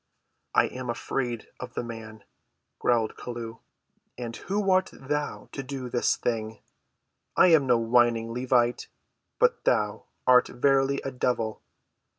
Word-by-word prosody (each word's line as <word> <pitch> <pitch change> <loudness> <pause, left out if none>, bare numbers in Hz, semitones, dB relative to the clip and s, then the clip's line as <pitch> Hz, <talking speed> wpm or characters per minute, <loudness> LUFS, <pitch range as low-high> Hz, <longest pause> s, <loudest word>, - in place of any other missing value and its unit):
"I - - +6
am 125 -1 -6
afraid 120 -1 -3
of 125 -1 -8
the - - -2
man," 110 -2 -8 0.6
growled 115 -3 +2
Chelluh. 115 -2 -6 0.6
"And 120 -2 -5
who 195 0 -1
art 185 0 +3
thou 145 +2 -4
to 135 - -5
do 130 -2 -6
this 120 - +2
thing! 110 -2 -2 0.8
I 180 - +7
am 150 -5 +5
no 120 -1 +5
whining 115 0 +2
Levite; 125 -1 +1 0.5
but 480 0 +2
thou—art 125 - +2
verily 135 +1 +2
a 135 - -2
devil." 120 -3 -1
125 Hz, 130 wpm, -27 LUFS, 115-135 Hz, 0.8 s, I